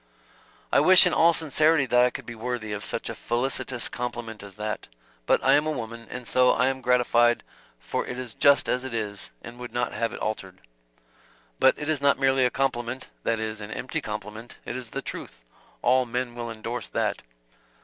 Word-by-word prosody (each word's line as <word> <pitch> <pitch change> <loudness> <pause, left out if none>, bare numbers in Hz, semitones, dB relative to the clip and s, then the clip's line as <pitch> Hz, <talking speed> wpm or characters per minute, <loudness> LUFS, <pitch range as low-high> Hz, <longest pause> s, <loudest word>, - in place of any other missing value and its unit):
"I - - +5
wish 185 0 +8
in 180 - +2
all 170 +1 +6
sincerity 155 -2 +2
that 125 -1 +4
I 125 - +4
could - - -8
be 120 - -7
worthy 115 -1 -4
of 105 0 -4
such - - -3
a - - -3
felicitous 120 0 -2
compliment 120 -2 -5
as 100 -1 -11
that. 105 0 -4 0.4
But - - +3
I 135 - +5
am 150 +2 +3
a - - +1
woman, 115 -4 -6
and 125 - -7
so 125 0 +4
I 125 +2 +3
am 130 0 -3
gratified 120 -1 +3 0.4
for - - -3
it 125 -2 -6
just 140 0 +5
as 125 - 0
it 130 -3 -5
is, 105 -3 -4
and 120 +1 -10
would 125 0 -7
not 120 0 -1
have 115 -1 -1
it - - -7
altered." 95 -4 -4 1.0
"But 130 - +5
it 150 - -5
is 155 -3 0
not 140 0 +4
merely 135 -1 +3
a - - +3
compliment 130 -1 -2
that 115 -1 0
is, 110 -1 -4
an 105 - -7
empty 125 +3 -3
complement 105 +2 -7
it - - -4
is 125 -2 -6
the - - -5
truth. - - -8 0.4
All 125 +1 +3
men 125 +1 -2
will 120 -1 -5
endorse 115 +2 -5
that." - - -1
120 Hz, 200 wpm, -26 LUFS, 115-130 Hz, 1.0 s, wish